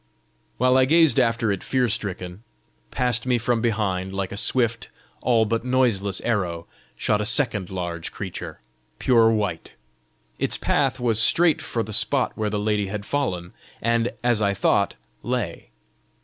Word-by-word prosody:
While 125 +1 +3
I 130 - +5
gazed 160 -3 +4
after 115 -3 +1
it 100 - -2
fear 130 -2 +1
stricken, 95 -3 -3 0.5
past 125 -1 0
me 125 -1 +3
from 120 0 0
behind, 95 -5 -1
like 95 -1 -3
a - - -5
swift, 115 +1 0 0.3
all 115 -3 +3
but 115 +2 -1
noiseless 115 -7 +1
arrow, 90 -8 -2 0.3
shot 105 -1 0
a - - 0
second 110 -6 +2
large 85 -3 -4
creature, - - -7 0.4
pure 115 -3 +4
white. 105 -7 -2 0.6
Its - - 0
path 135 -2 0
was 115 -3 +1
straight 165 +7 +4
for 115 - -2
the 110 - -6
spot 120 +5 +1
where 110 -1 -1
the 105 - -2
lady 105 -1 0
had 100 +1 -5
fallen, 90 -12 -2 0.3
and, 115 +1 +1
as 120 -3 +2
I 100 -1 +1
thought, - - +1 0.3
lay. 120 -9 -3
110 Hz, 155 wpm, -23 LUFS, 100-125 Hz, 0.6 s, I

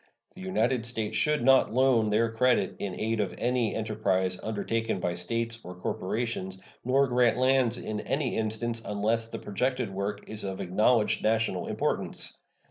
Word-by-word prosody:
The 190 - -12
United 125 -10 0
States 110 -2 -1
should 150 -2 +1
not 135 -5 +5
loan 125 -4 +4
their 110 +2 +2
credit 125 +2 +2
in 95 -3 -4
aid 110 0 -1
of 100 -3 -1
any 120 -2 0
enterprise 95 -4 0
undertaken 110 0 -2
by 90 -1 -1
States 115 +6 -2
or 90 - -8
corporations, 95 +1 -3 0.3
nor 135 +3 +3
grant 125 -2 +3
lands 130 -2 +3
in 110 -1 -4
any 135 +1 -1
instance, 110 +1 -1
unless 110 +3 0
the - - -5
projected 125 +1 -2
work 100 +1 -4
is 110 0 -2
of 95 -1 -4
acknowledged 105 +5 +2
national 110 -4 0
importance. - - -2
115 Hz, 155 wpm, -28 LUFS, 105-125 Hz, 0.3 s, not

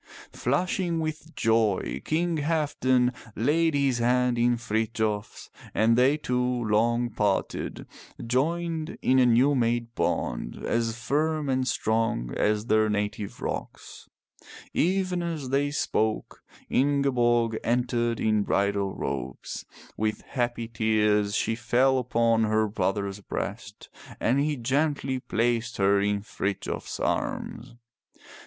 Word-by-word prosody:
Flushing 170 +5 0
with 155 0 -5
joy 110 - +1
King 165 +1 0
Halfdan 140 -5 +1 0.2
laid 155 +6 +2
his 135 -3 +1
hand 125 +1 +2
in 120 0 +3
Frithjof's 110 -2 -2 0.2
and 115 +1 +4
they 130 +5 +4
two, 125 -4 -1
long 120 0 +1
parted, 105 -2 -1 0.4
joined 160 +6 -1
in 130 +1 +4
a 125 - +5
new 125 +5 +4
made 120 -2 0
bond - - -2
as 115 0 0
firm 150 +3 0
and 130 -1 +1
strong 110 - 0
as 105 0 +1
their 110 -2 +3
native 105 -1 -3
rocks. - - -6 0.6
Even 185 0 +1
as 160 -6 -4
they 140 +2 +1
spoke 110 -6 -1 0.3
Ingeborg 120 -5 +2
entered 120 -1 0
in 110 -1 +2
bridal 100 -1 0
robes. 60 +1 -5 0.3
With 110 0 -1
happy 120 -3 -2
tears 105 -2 +1
she 115 - +1
fell 125 +3 +2
upon 115 -2 +2
her 110 0 +2
brother's 100 0 -2
breast 105 +1 -6 0.3
and 125 +5 +2
he 150 +1 +1
gently 135 +1 0
placed 115 -1 -1
her 100 0 +3
in 100 0 0
Frithjof's 100 -2 -4
arms. 120 +1 -3
120 Hz, 115 wpm, -27 LUFS, 110-140 Hz, 0.6 s, a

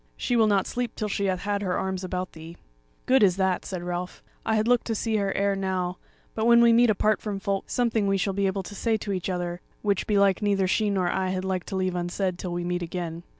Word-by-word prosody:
she 245 - 0
will 225 -2 +5
not 200 -2 +2
sleep 245 -2 -3
till 215 - -2
she 200 -1 -1
hath 185 -2 0
had 205 0 -1
her 185 -3 -1
arms 190 -1 -2
about 185 0 -3
thee." 165 +1 -11 0.5
"Good 260 0 +4
is 190 -3 +4
that," 190 -1 0
said 185 -3 -5
Ralph; 175 0 -5 0.2
"I 220 - +1
had 215 +1 +1
looked 245 -1 +3
to 225 - -1
see 220 0 0
her 200 -1 0
ere 200 0 +2
now; 185 -2 -2 0.3
but 220 +1 0
when 235 0 +7
we 235 0 +6
meet 240 +1 +5
apart 215 0 +2
from 205 -2 -3
folk, 195 0 -2
something 230 -4 +1
we 195 0 +2
shall 195 +1 0
be 200 0 +1
able 190 0 -2
to 205 - -9
say 220 +2 0
to 205 -1 -4
each 185 0 -3
other, 175 -1 -3 0.2
which 200 -3 0
belike 200 -2 +3
neither 200 -2 +2
she 210 +3 +1
nor 190 -3 +1
I 190 +1 0
had 185 0 -2
liked 185 -2 -2
to 195 - -4
leave 185 -1 0
unsaid 180 +1 -2
till 180 - -4
we 175 0 -2
meet 175 0 -2
again." 170 -1 -4
195 Hz, 255 wpm, -26 LUFS, 180-210 Hz, 0.5 s, when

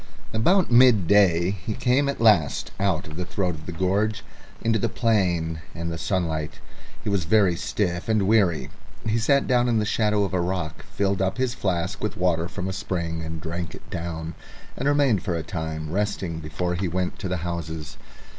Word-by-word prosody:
About 175 - +3
midday 100 -7 +5
he 100 +2 -4
came 135 +3 +2
at 140 - -3
last 105 -10 +3
out 95 -3 +1
of 75 0 -9
the 90 - -2
throat 90 0 -1
of 80 0 -10
the - - -3
gorge 95 +5 0 0.4
into 115 -1 +1
the 115 - 0
plain 90 -9 +1
and 85 0 -3
the 80 - -3
sunlight. 80 -6 -1 0.5
He - - -8
was 100 -6 0 0.3
stiff 90 0 -1
and 105 -3 +2
weary; 100 -7 +2 0.3
he 110 +1 +1
sat 140 +5 +3
down 125 -1 +3
in 115 - +2
the 105 - +1
shadow 105 -1 +2
of 100 - -2
a 90 - +2
rock, 85 -4 -3
filled 100 -1 -1
up 95 +3 0
his 130 -1 0
flask 95 -4 -2
with 105 - -2
water 85 -2 +1
from 95 0 -5
a 95 - -2
spring 85 -4 -3
and 80 0 -5
drank 85 +2 -5
it - - -15
down, 80 -1 -4 0.4
and 135 - -2
remained 140 -9 +3
for 90 - -2
a 80 - -2
time 80 -2 -4
resting 95 -4 -1
before 80 +3 -3
he 90 +2 -1
went 90 +1 -1
on - - -21
to 100 - -3
the 95 0 -1
houses. 80 -3 -5
95 Hz, 195 wpm, -24 LUFS, 85-110 Hz, 0.5 s, midday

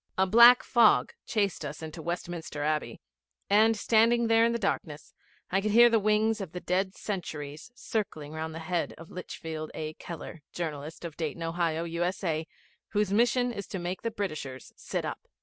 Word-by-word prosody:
A 190 - +4
black 235 +5 +8
fog 235 -3 +4
chased 200 -7 0
us 150 +2 -6
into 160 +1 -7
Westminster 170 -3 -4
Abbey, 155 0 -1 0.5
and, 220 +2 +5
standing 230 +2 +3
there 225 0 +4
in 235 - +2
the 235 - 0
darkness, 165 -8 -3 0.4
I 195 +1 +2
could 215 - -1
hear 235 +3 +7
the 225 - +4
wings 215 +1 +2
of 185 -4 -7
the 180 - -4
dead 190 +2 -1
centuries 155 -6 -5
circling 160 -12 -3
round 160 0 -5
the 165 0 -7
head 175 0 -1
of 165 +1 -12
Litchfield 160 -3 -6
A. 155 0 -4
Keller, 165 0 -8
journalist, 155 -1 -5
of 165 -3 -7
Dayton, 165 0 -3
Ohio, 165 -1 -1
U.S.A., 170 -1 -2 0.5
whose 205 -2 +1
mission 245 +3 +3
it 235 - -9
was 200 - -5
to - - -5
make 175 +1 -4
the 230 - -1
Britishers 155 - -5
sit - - -4
up. - - -4
180 Hz, 180 wpm, -29 LUFS, 160-215 Hz, 0.5 s, black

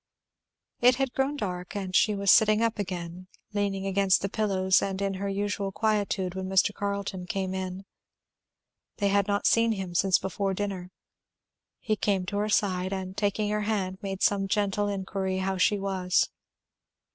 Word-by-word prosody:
It 250 +1 +5
had 265 -1 -1
grown 275 +2 0
dark, 180 -4 -4
and 190 -2 -3
she 210 -2 +4
was 200 -1 +3
sitting 215 0 +5
up 230 -1 0
again, 180 -2 -5 0.3
leaning 200 -1 -1
against 195 -1 +2
the 200 - -1
pillows 190 -3 +2
and 195 -1 -2
in 200 -1 -1
her 200 - -1
usual 200 0 -2
quietude, 205 -3 0
when 190 0 -4
Mr. 190 +2 +3
Carleton 200 -3 -3
came 190 0 -2
in. 190 0 -5 1.1
They 200 -2 +1
had 200 0 +2
not 205 0 0
seen 230 0 +4
him 190 -4 -5
since 185 +1 +3
before 195 +1 -2
dinner. 190 -3 -4 0.9
He 215 - -1
came 195 -3 0
to 200 +3 -3
her 210 +1 0
side 185 -3 +1
and 190 -1 -4
taking 205 0 0
her 210 0 0
hand 195 -3 -2
made 195 -2 -4
some 195 -1 +2
gentle 205 0 0
inquiry 190 -1 -2
how 190 0 -1
she 205 +3 +3
was. 190 -2 +1
195 Hz, 170 wpm, -27 LUFS, 190-205 Hz, 1.1 s, It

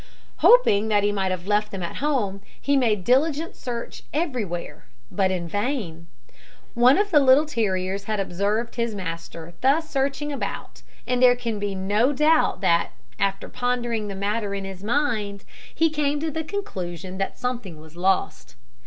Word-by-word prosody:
Hoping 220 - +5
that 205 -2 +2
he 205 - +2
might 195 -2 -1
have 185 -1 -3
left 210 +1 +1
them 190 -2 -5
at 170 - -5
home, 240 -9 -1 0.2
he 280 - +1
made 220 -8 +2
diligent 295 - +1
search 240 -2 -6
everywhere, 215 - -3 0.2
but 195 -2 +1
in 180 -2 -2
vain. 205 - -3 0.7
One 245 +3 +5
of 410 0 +1
the 300 - +6
little 275 +2 +6
terriers 195 -7 -1
had 215 -1 -2
observed 200 +6 -1
his 235 -2 -1
master 165 -2 -6
thus 300 +5 +2
searching 275 +2 -1
about, 275 - -5 0.2
and 250 0 0
there 250 -1 +7
can 230 -4 -3
be 200 -1 -2
no 205 +8 +1
doubt 300 - +3
that, 170 -3 +2 0.3
after 195 0 0
pondering 240 -3 -2
the 200 - -5
matter 200 +1 -2
in 195 -1 -4
his 195 0 -8
mind, 215 -5 -1 0.3
he 325 -1 +3
came 295 -1 0
to 320 +1 -2
the 320 +2 -3
conclusion 190 - -5
that 195 - -2
something 235 -10 -4
was 160 +1 -15
lost. 180 -7 -1
215 Hz, 165 wpm, -24 LUFS, 190-270 Hz, 0.7 s, there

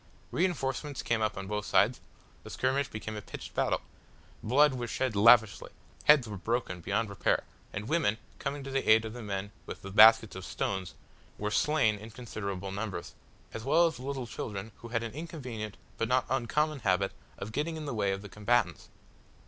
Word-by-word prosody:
Reinforcements 145 -5 -1
came 115 -1 0
up 110 -2 0
on 95 - -4
both 105 +1 -2
sides. 105 +6 +3 0.4
The - - -10
skirmish 135 +2 0
became 110 -2 -6
a 105 - -5
pitched - - -9
battle. - - +1 0.6
Blood 145 +2 +4
was 120 -2 -4
shed 130 -1 -1
lavishly, 110 0 +5 0.4
heads 150 -5 +6
were 105 -2 -5
broken 105 -2 -2
beyond 105 +5 0
repair, 100 -3 0 0.3
and 105 +2 -5
women, 140 -9 +2 0.2
coming 140 0 -3
to 135 - -6
the 135 0 +1
help 110 +1 +5
of 110 - -5
the 120 - -7
men 100 -1 -4 0.2
with - - -7
the 100 - -7
baskets 110 +1 +7
of 95 - -6
stones, 95 0 -3 0.4
were 105 0 -2
slain 130 -6 +2
in 110 +2 -9
considerable 100 -5 -5
numbers, 100 -3 -4 0.4
as 115 - -5
well 155 +6 +4
as 160 -5 -1
little 135 -1 -4
children 105 -2 -5
who 115 - -10
had 115 0 -1
an 115 - -4
inconvenient 125 - -6 0.2
but 115 - +1
not 130 +2 +2
uncommon 145 +4 +1
habit 95 -3 +1 0.3
of 105 - -6
getting 155 +6 -2
in 155 - -6
the 140 - -3
way 100 -3 +1
of 95 +1 -4
the - - -7
combatants. 105 +4 0
115 Hz, 190 wpm, -30 LUFS, 105-135 Hz, 0.6 s, baskets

